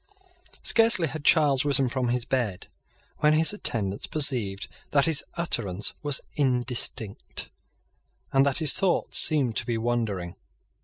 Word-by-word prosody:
Scarcely 225 -7 +4
had 150 +1 -7
Charles 145 -5 +3
risen 140 -2 +1
from 125 0 -2
his 120 0 -2
bed 120 -8 -3 0.5
when 150 0 +2
his 160 +5 +4
attendants 105 - -3
perceived 115 -10 0 0.2
that 140 -1 +2
his 160 -3 +1
utterance 105 - -1
was 145 -2 -1
indistinct, 125 -6 -1 0.8
and 135 0 +4
that 140 -1 0
his 155 -4 +4
thoughts 190 -2 +1
seemed 135 -8 +2
to - - -1
be 120 -1 -1
wandering. 110 -7 -3
130 Hz, 135 wpm, -25 LUFS, 115-150 Hz, 0.8 s, Scarcely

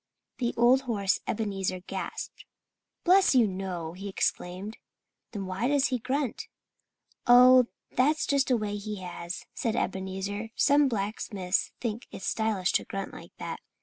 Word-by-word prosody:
The 240 -2 -1
old 245 +3 +5
horse 200 -4 +1
Ebenezer 195 -4 -2
gasped. - - -6 0.6
"Bless 370 -4 +5
you, 245 -3 +6
no!" 185 -4 -4
he 195 +3 -7
exclaimed. 190 +2 -2 0.5
"Then 200 -3 -4
why 190 +6 -1
does 280 -2 +3
he 255 -2 -1
grunt?" 265 +1 -2 0.8
"Oh, 250 0 +8 0.2
that's 295 +5 +2
just 280 -1 +2
a 250 - +4
way 205 -1 -3
he 205 -1 -6
has," 175 0 -6
said 230 -1 -1
Ebenezer. 195 +3 -3
"Some 285 0 +4
blacksmiths 200 -4 -1
think 235 0 -4
it's 190 - -8
stylish 215 -4 0
to - - +2
grunt 195 0 -5
like - - -12
that." - - -5
210 Hz, 145 wpm, -28 LUFS, 190-250 Hz, 0.8 s, Oh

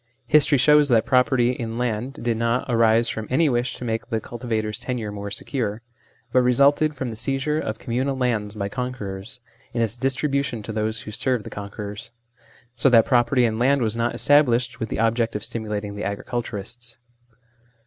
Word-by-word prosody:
History 145 -1 +4
shows 150 +2 +5
that 115 -3 +4
property 125 -1 +3
in 115 -2 -5
land 120 +1 -2
did 120 -1 +1
not 115 +2 0
arise 115 -1 +4
from 110 -2 -4
any 155 +5 +3
wish 120 -1 -1
to 125 - -7
make 115 0 -3
the 110 -2 0
culti 120 +2 -9
vator's 110 -2 -1
tenure 120 -5 -3
more 100 0 -6
secure, 110 +1 -3 0.5
but 130 - +5
resulted 140 +5 +3
from 130 -2 -3
the 110 - -6
seizure 135 +6 -1
of 110 -7 -3
communal 130 +4 -2
lands 110 -5 -1
by 100 -2 -2
conquerors, 125 -1 -5 0.3
and 115 - +2
its 115 +1 -2
distribution 135 -2 -1
to 110 - -6
those 110 +1 -2
who 105 - -8
served 125 +1 -1
the - - -9
conquerors. 105 +1 -7 0.7
So 130 +3 +3
that 115 -3 +6
property 125 0 +3
in 110 -1 -1
land 135 +1 +3
was 110 0 0
not 115 +1 -1
established 125 -4 +3
with 115 -3 -3
the - - -3
object 115 0 +1
of 105 - -3
stimulating 105 -3 -4
the 105 - -5
agriculturists. 115 +2 -5
120 Hz, 180 wpm, -23 LUFS, 110-130 Hz, 0.7 s, that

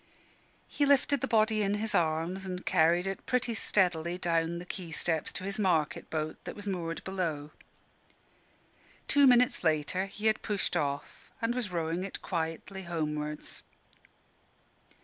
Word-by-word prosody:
He 290 - -1
lifted 280 -1 +3
the - - 0
body 215 -1 +3
in 200 0 +1
his 215 +1 -1
arms, 165 +4 +1
and 185 -1 -5
carried 175 0 +3
it 195 0 -4
pretty 250 -2 +1
steadily 175 -5 +1
down 170 -1 0
the 175 - -7
quay 180 -1 -6
steps 160 0 -1
to - - -5
his 195 +2 -2
market 170 -7 +1
boat, 155 0 -3
that - - -5
was 205 - -8
moored 170 -4 -3
below. 165 -6 -3 1.6
Two 285 -1 +6
minutes 250 -4 +4
later 160 +4 +1
he 205 +2 -8
had 220 0 +3
pushed 205 -4 -1
off 145 -4 -3
and 230 +1 0
was 240 -6 -2
rowing 170 +1 -1
it 195 - -5
quietly 170 +3 -3
homewards. 150 -3 -3
180 Hz, 150 wpm, -30 LUFS, 160-205 Hz, 1.6 s, Two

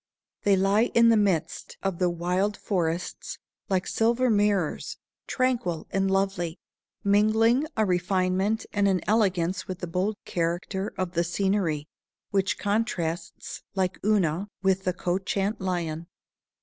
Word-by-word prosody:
They 200 -1 +4
lie 195 +4 +3
in 235 0 +7
the 230 - +6
midst 195 -7 0
of 195 -3 -1
the 180 -1 +3
wild 180 +4 0
forests, 175 -3 -2 0.3
like 190 -1 +1
silver 235 +2 +2
mirrors, 205 -6 +1 0.3
tranquil 240 -11 0
and 195 0 +1
lovely, 190 -3 0 0.5
mingling 220 +7 +3
a 220 - +3
refinement 185 +3 +1
and 205 -1 +2
an 185 -3 +2
elegance 185 -4 +1
with 185 - -4
the 180 - -5
bold 185 +5 -1
character 175 +3 -2
of 185 -2 -2
the 170 -1 +1
scenery, 175 -4 0 0.4
which 195 -1 +1
contrasts, 200 -6 -2
like 190 -1 0
Una, 195 -3 +1 0.2
with 190 0 +2
the 185 - +1
couchant 195 +4 -1
Lion. 170 -3 -2
190 Hz, 130 wpm, -26 LUFS, 175-205 Hz, 0.5 s, in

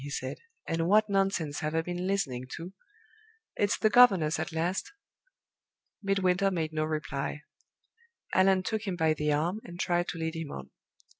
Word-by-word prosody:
he 145 - -6
said. 130 -2 -4 0.3
"And 165 0 0
what 215 +2 +4
nonsense 195 -7 0
have 155 +1 -2
I 165 - +1
been 180 +1 -3
listening 130 -11 -1
to! 175 +3 -8 0.8
It's 205 -1 +1
the 215 - +2
governess 195 -11 +6
at - - -3
last." 175 - -2 1.1
Midwinter 195 -1 +2
made 160 -4 -2
no 155 0 0
reply. 150 -1 -3 0.9
Allan 190 0 +4
took 220 +1 -2
him 190 - -1
by 160 -2 +2
the 150 -1 -1
arm, 170 +8 0
and 175 0 -10
tried 175 -1 +1
to - - -4
lead 160 0 -3
him 165 -2 -5
on. 65 0 -8
175 Hz, 165 wpm, -29 LUFS, 155-195 Hz, 1.1 s, governess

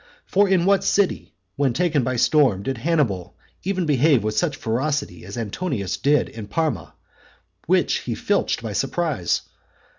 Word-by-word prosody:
For 200 +1 +2
in 185 -3 +3
what 200 0 +3
city, 185 - 0 0.2
when 135 -3 +2
taken 155 -1 +1
by 130 +1 -1
storm, 130 - +3
did 130 +1 -3
Hannibal 125 - 0 0.2
even 185 -1 -1
behave 145 -4 +3
with 110 0 -2
such 150 +3 +1
ferocity 125 - -2
as 100 +5 -8
Antonius 115 - -3
did 145 -1 +2
in 110 -2 -9
Parma, 135 - -2 0.7
which - - +2
he - - -4
filched - - 0
by 110 -2 -4
surprise? 135 - -1
135 Hz, 150 wpm, -22 LUFS, 110-165 Hz, 0.7 s, in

